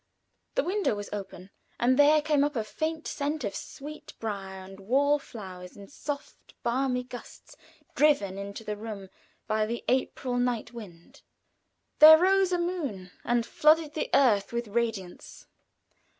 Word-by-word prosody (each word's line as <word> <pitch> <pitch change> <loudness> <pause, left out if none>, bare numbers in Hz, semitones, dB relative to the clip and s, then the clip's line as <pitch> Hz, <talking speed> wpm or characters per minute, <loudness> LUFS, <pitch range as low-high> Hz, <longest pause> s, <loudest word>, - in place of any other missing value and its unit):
The - - +2
window 385 - 0
was 205 0 -7
open, 195 -2 -7 0.3
and 250 +2 +3
there 295 +2 +5
came 300 -2 +2
up 290 0 -1
a 225 - 0
faint 315 +8 -4
scent 295 0 -3
of 200 -2 -2
sweetbrier 205 -9 -7
and 195 +1 -12
wall 280 +8 +2
flowers 185 -8 -10
in 200 -1 -11
soft, 290 0 -7
balmy 250 +1 0
gusts, 245 -1 -11 0.4
driven 240 -11 +2
into 200 +2 -7
the 210 -1 -4
room 205 -3 -7 0.4
by 215 0 0
the 235 +1 -4
April 255 0 0
night 245 -2 -1
wind. 180 -8 -12 0.8
There 315 +1 +11
rose 380 +2 +3
a 355 - +2
moon 290 - -3
and 240 -1 +1
flooded 305 +2 +3
the 310 - -3
earth 215 -8 +3
with 235 -2 -3
radiance. 220 -5 -4
240 Hz, 145 wpm, -28 LUFS, 205-295 Hz, 0.8 s, There